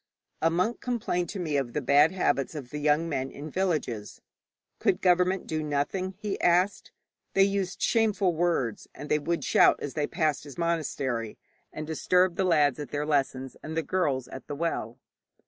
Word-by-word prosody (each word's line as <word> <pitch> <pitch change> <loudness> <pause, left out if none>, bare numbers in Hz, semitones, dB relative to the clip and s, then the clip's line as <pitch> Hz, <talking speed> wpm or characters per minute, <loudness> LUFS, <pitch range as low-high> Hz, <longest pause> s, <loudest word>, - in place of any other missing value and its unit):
A 165 - +4
monk 185 +8 0
complained 210 -8 -1
to 200 - -5
me 155 -5 -1
of 125 -4 -2
the - - 0
bad 145 +4 +5
habits 165 -6 0
of 135 -5 -7
the 150 - -4
young 150 +2 +2
men 135 -4 -2
in 145 +3 -8
villages. 150 - -2 0.6
'Could - - +2
government 180 +1 +2
do 155 -1 -2
nothing?' 155 +6 -2
he 205 -1 -4
asked. 180 +3 +2 0.4
They 195 - +6
used 195 -1 -1
shameful 210 -5 +2
words, 160 -10 0
and 150 - -8
they 150 - +3
would 170 +3 -2
shout - - +5
as 145 - -5
they 150 -2 -1
passed 155 -3 0
his 145 -2 -11
monastery, 140 -9 -2 0.3
and 155 - -6
disturb 180 +3 +2
the 190 - +1
lads 150 -6 +3
at 145 -4 -5
their 145 +2 -2
lessons 135 -3 -1
and 160 +1 -6
the 165 - +1
girls 140 -7 0
at 130 - -10
the 145 - -4
well. 140 -8 -2
155 Hz, 180 wpm, -28 LUFS, 145-180 Hz, 0.6 s, They